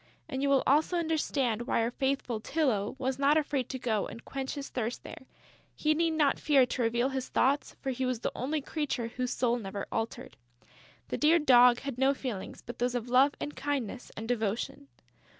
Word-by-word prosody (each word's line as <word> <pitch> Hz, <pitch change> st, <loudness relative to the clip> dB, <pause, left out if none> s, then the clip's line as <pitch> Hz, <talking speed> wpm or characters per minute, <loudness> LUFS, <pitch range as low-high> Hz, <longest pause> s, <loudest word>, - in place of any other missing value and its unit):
And 265 Hz, -4 st, -3 dB
you 280 Hz, -, +1 dB
will 275 Hz, -1 st, +4 dB
also 310 Hz, +5 st, +3 dB
understand 280 Hz, -8 st, 0 dB
why 230 Hz, -, +2 dB
our 230 Hz, -, -1 dB
faithful 265 Hz, -4 st, -1 dB
Tylô 245 Hz, -9 st, 0 dB
was 260 Hz, 0 st, -2 dB
not 285 Hz, +2 st, +4 dB
afraid 285 Hz, -4 st, -1 dB
to 260 Hz, -, -3 dB
go 225 Hz, -5 st, -1 dB
and 230 Hz, -, -10 dB
quench 270 Hz, +1 st, -4 dB
his 280 Hz, -1 st, -5 dB
thirst 245 Hz, -1 st, -3 dB
there: 260 Hz, -, -10 dB, 0.5 s
he 305 Hz, 0 st, +2 dB
need 330 Hz, +1 st, +1 dB
not 295 Hz, -3 st, +2 dB
fear 280 Hz, -4 st, +4 dB
to 250 Hz, -, -3 dB
reveal 240 Hz, +3 st, +1 dB
his 265 Hz, -1 st, -4 dB
thoughts, 270 Hz, +1 st, +1 dB
for 270 Hz, -, -1 dB
he 260 Hz, +1 st, -3 dB
was 255 Hz, -3 st, -1 dB
the -, -, -1 dB
only 290 Hz, +5 st, -1 dB
creature 275 Hz, -6 st, -2 dB
whose 250 Hz, +1 st, -3 dB
soul 240 Hz, -1 st, +1 dB
never 200 Hz, -1 st, -5 dB
altered. 235 Hz, +3 st, -4 dB, 0.7 s
The -, -, -3 dB
dear 315 Hz, +3 st, +5 dB
Dog 250 Hz, -5 st, +6 dB
had 275 Hz, -3 st, -5 dB
no 270 Hz, +1 st, +3 dB
feelings 240 Hz, -9 st, -6 dB
but 240 Hz, 0 st, -8 dB
those 245 Hz, +1 st, 0 dB
of 245 Hz, 0 st, -3 dB
love 265 Hz, +3 st, +5 dB
and 295 Hz, -, -5 dB
kindness 265 Hz, -4 st, -3 dB
and 220 Hz, +1 st, -5 dB
devotion. 245 Hz, +5 st, -2 dB
260 Hz, 200 wpm, -30 LUFS, 240-280 Hz, 0.7 s, Dog